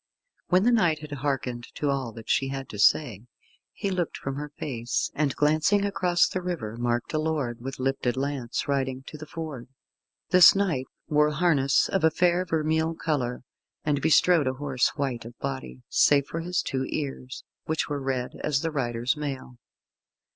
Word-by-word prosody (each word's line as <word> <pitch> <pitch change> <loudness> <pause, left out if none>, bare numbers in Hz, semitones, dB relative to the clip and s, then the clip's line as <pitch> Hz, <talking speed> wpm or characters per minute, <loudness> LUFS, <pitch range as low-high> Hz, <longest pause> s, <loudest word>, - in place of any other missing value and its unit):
When 180 +2 +4
the 245 - +4
knight 175 -10 +2
had 150 -1 -9
hearkened 130 -4 -3
to 145 -1 0
all 135 -4 -2
that 115 0 -11
she 135 - +2
had 135 -1 -5
to 105 - -8
say, 120 -2 +3 0.4
he 200 -2 -3
looked 180 -3 -2
from 135 - -4
her 150 +1 -5
face, 120 -4 -2
and 145 -2 0
glancing 155 +7 +3
across 180 -3 +2
the 185 - -3
river, 165 -12 -4
marked 120 +2 -1
a 155 - +1
lord, 145 -7 -2
with 135 +2 -6
lifted 130 -1 -1
lance, 135 -3 -2
riding 135 -2 -1
to 155 - -9
the 155 - -8
ford. 155 -6 -6 0.6
This 180 +1 +9
knight 175 -10 0 0.2
wore 150 0 +3
harness 150 -4 +2
of 190 -4 -1
a 160 - +6
fair 175 +2 +2
vermeil 160 0 0
colour, 130 -8 -2 0.4
and 145 -2 0
bestrode 160 -1 +4
a 130 - +1
horse 135 -2 0
white 135 -5 -2
of 115 +1 -11
body, 130 - -5
save 140 -1 +4
for 165 - -5
his 175 +2 -1
two 130 -1 -2
ears, 135 -3 -5 0.2
which 160 0 -1
were 145 -2 -3
red 130 -2 -2
as 145 -2 +1
the 165 - -2
rider's 120 -3 -1
mail. 135 -4 -6
145 Hz, 175 wpm, -26 LUFS, 130-160 Hz, 0.6 s, This